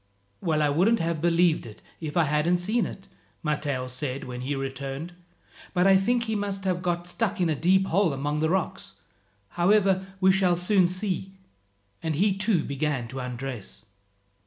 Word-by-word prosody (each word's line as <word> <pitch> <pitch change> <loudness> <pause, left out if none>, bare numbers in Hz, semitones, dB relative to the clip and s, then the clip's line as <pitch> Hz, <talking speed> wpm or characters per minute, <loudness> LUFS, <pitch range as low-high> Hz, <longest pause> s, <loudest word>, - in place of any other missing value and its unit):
"Well, 155 -4 +1
I 145 - +3
wouldn't 185 +11 +3
have 165 -2 -1
believed 170 -4 +2
it 105 -1 -13 0.2
if 155 0 -4
I 170 - +5
hadn't 150 +4 +2
seen 210 +6 0
it," 195 - -10 0.4
Matteo 145 -4 -1
said 130 +1 -4
when 125 -1 -6
he 140 +3 -2
returned, 135 +4 -5 0.6
"but 180 +1 +3
I 195 0 +7
think 235 +5 +2
he 220 -1 -2
must 200 -1 -3
have 180 -2 0
got 175 -1 -2 0.3
into 170 -3 +2
a - - -3
deep 190 +5 +3
hole 190 -1 +2
among 145 +2 -2
the 160 +1 +1
rocks. 185 0 -2 0.6
However, 190 - +2
we 190 0 +5
shall 185 -2 +3
soon 180 +1 +3
see," 185 +1 -3 0.7
and 160 -2 -1
he 195 +4 +2
too 195 -4 +1
began 140 -3 -2
to 130 +2 -6
undress. 125 -4 -6
170 Hz, 170 wpm, -26 LUFS, 145-190 Hz, 0.7 s, I